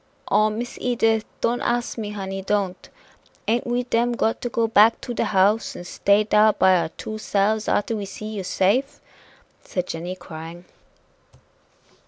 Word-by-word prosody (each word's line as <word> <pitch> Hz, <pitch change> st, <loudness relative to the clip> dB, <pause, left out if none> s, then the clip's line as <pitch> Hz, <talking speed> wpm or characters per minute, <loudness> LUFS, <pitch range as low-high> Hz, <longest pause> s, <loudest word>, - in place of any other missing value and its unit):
"Oh! 215 Hz, 0 st, +4 dB
Miss 235 Hz, +3 st, -5 dB
Edith, 225 Hz, -3 st, +1 dB, 0.2 s
don't 240 Hz, +1 st, 0 dB
ask 240 Hz, 0 st, -1 dB
me, 215 Hz, -3 st, -4 dB
honey 195 Hz, -2 st, -5 dB
don't! 195 Hz, -2 st, -2 dB, 0.6 s
Ain't 235 Hz, +3 st, +1 dB
we 245 Hz, +1 st, 0 dB
dem 240 Hz, 0 st, +1 dB
got 225 Hz, -1 st, 0 dB
to 245 Hz, -, -2 dB
go 230 Hz, 0 st, +1 dB
back 225 Hz, 0 st, +5 dB
to 245 Hz, -, -5 dB
de -, -, 0 dB
house 205 Hz, +3 st, +2 dB
and 175 Hz, -, -8 dB
stay 200 Hz, +3 st, +2 dB
dar 210 Hz, 0 st, +4 dB
by 190 Hz, 0 st, +4 dB
our 165 Hz, -2 st, 0 dB
two 215 Hz, +6 st, -7 dB
selves 215 Hz, +1 st, 0 dB
arter 225 Hz, +2 st, +1 dB
we 205 Hz, -2 st, -4 dB
see 200 Hz, +2 st, -8 dB
you 210 Hz, -3 st, -4 dB
safe?" 210 Hz, +10 st, +1 dB, 0.6 s
said 180 Hz, -1 st, -3 dB
Jenny, 175 Hz, +2 st, -5 dB
crying. 170 Hz, 0 st, -10 dB
210 Hz, 165 wpm, -23 LUFS, 190-230 Hz, 0.6 s, back